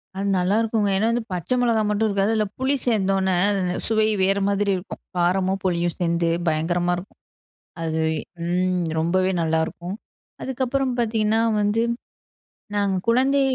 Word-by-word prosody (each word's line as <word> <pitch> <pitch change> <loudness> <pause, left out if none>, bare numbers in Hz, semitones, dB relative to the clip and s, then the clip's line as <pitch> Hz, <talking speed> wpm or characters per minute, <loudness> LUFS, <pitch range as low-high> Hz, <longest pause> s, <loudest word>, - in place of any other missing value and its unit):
அது 195 +1 -2
நல்லாயிருக்குங்க. 210 +3 +1
ஏன்னா, 215 +3 +2
வந்து 235 0 -1
பச்சை 180 +7 -1
மிளகாய் 225 -3 +2
மட்டும் 210 +1 +1
இருக்காது. 200 +2 +1
அதில 215 -1 +1
புளி 265 +2 +2
சேர்ந்தோன, 195 -4 +2 0.6
சுவை 220 -1 +2 0.2
வேறு 195 +1 +2
மாதிரி 200 0 +1
இருக்கும். 180 - -8 0.2
காரமும் 185 +2 +1
புளியும் 175 -2 0
சேர்ந்து 170 -1 +1 0.2
பயங்கரமா 175 +3 +1
இருக்கும். 180 +3 -11 0.6
அது, 160 -1 -1 0.5
ம். 180 0 0
ரொம்பவே 185 +3 +1
நல்லாயிருக்கும். 160 +3 -1 0.5
அதுக்கப்புறம் 260 0 -1
பாத்தீங்கன்னா 220 -1 +1 0.2
வந்து 210 +2 +1 0.9
நாங்க 200 -2 +1
குழந்தை, 265 +4 +3
195 Hz, 130 wpm, -23 LUFS, 180-225 Hz, 0.9 s, குழந்தை